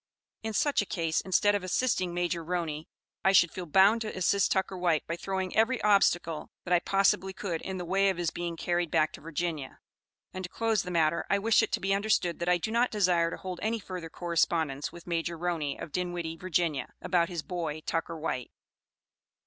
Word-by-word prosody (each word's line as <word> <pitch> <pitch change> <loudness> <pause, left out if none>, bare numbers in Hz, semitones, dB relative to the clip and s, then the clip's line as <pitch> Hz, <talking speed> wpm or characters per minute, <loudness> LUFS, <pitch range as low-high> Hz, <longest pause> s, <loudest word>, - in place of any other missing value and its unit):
In 220 0 -4
such 285 +6 +2
a - - -3
case, 165 -3 0
instead 205 +2 +3
of 205 -2 -1
assisting 185 -2 0
Major 175 -1 -1
Roney, 160 -3 -3 0.4
I 190 - +4
should 175 -3 +6
feel 180 -2 -6
bound 195 +8 +5
to 215 -3 -4
assist 190 +2 +2
Tucker 190 0 0
White 175 -4 +1
by 165 - -3
throwing 190 +1 -3
every 240 +3 +3
obstacle 175 -6 +2 0.2
that 180 - 0
I 175 - +6
possibly 195 0 +2
could 180 -4 -3
in 190 0 -4
the 180 - -4
way 195 +3 +3
of 190 - -1
his 170 -2 -1
being 170 -1 -4
carried 175 0 0
back 155 -1 +2
to - - -10
Virginia; 160 -3 -4 0.6
and 185 - -5
to - - -8
close 225 0 +1
the 180 - -6
matter 165 -2 +1
I 200 - +3
wish 220 +2 +4
it - - -1
to - - +1
be 195 +1 0
understood 200 -4 +1
that 170 +1 -1
I 180 - +4
do 220 +6 -3
not 240 +2 +3
desire 180 -5 +2
to - - -6
hold 185 -2 -6
any 225 +2 0
further 185 -5 -7
correspondence 160 -4 0
with 170 - -12
Major 170 -1 -2
Roney, 165 -4 -2
of 160 - -7
Dinwiddie, 175 -2 -3
Virginia, 170 -4 -1
about 170 -1 +1
his 170 -4 -4
'boy,' 160 -4 -4
Tucker 165 +1 -3
White." 140 -6 -3
175 Hz, 205 wpm, -29 LUFS, 165-195 Hz, 0.6 s, should